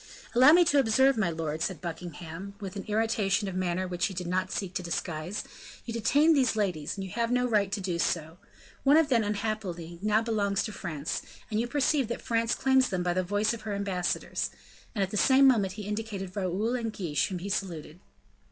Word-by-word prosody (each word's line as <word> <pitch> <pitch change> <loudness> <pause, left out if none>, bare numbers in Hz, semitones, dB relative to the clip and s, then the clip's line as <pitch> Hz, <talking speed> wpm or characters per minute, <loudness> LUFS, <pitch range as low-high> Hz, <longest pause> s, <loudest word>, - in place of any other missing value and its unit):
"Allow 260 +5 +8
me 350 +1 +6
to 285 -2 +4
observe, 265 +2 +4
my 215 -6 +1
lord," 160 -1 -3
said 185 +1 -2
Buckingham, 170 +2 -7
with 195 -2 -6
an 195 - -5
irritation 215 -2 +1
of 190 - -4
manner 185 0 -1
which 180 0 0
he 195 - -7
did 180 0 -4
not 180 +2 -1
seek 190 -3 -3
to 190 - -2
disguise, 170 +1 -3 0.4
"you 230 - -5
detain 285 +8 +4
these 260 -6 +2
ladies, 180 -6 -1
and 195 - -4
you 190 - -7
have 235 +1 -1
no 250 0 +2
right 205 -4 +2
to 205 - -1
do 180 -3 -2
so. 165 0 -1 0.4
One 285 +2 +6
of 320 -2 +3
them, 235 -4 +3
unhappily, 200 -5 -3
now 215 +2 +2
belongs 205 -3 0
to 220 - -4
France, 155 -7 -4 0.3
and 215 - +1
you 235 - 0
perceive 275 0 +1
that 235 - -4
France 230 0 +1
claims 265 -1 +3
them 185 -3 -1
by 175 0 +1
the 185 - +1
voice 205 +5 0
of 230 - -7
her 215 -2 -3
ambassadors;" 195 -3 -1 0.5
and 200 - +1
at 190 - -3
the 210 - -2
same 270 +5 +6
moment 205 -8 +3
he 210 +1 -7
indicated 205 -3 -4
Raoul 200 +4 -1
and 230 -3 -2
Guiche, 175 -8 -1
whom 185 - -4
he 185 +3 -5
saluted. 170 -5 -4
200 Hz, 215 wpm, -28 LUFS, 180-230 Hz, 0.5 s, Allow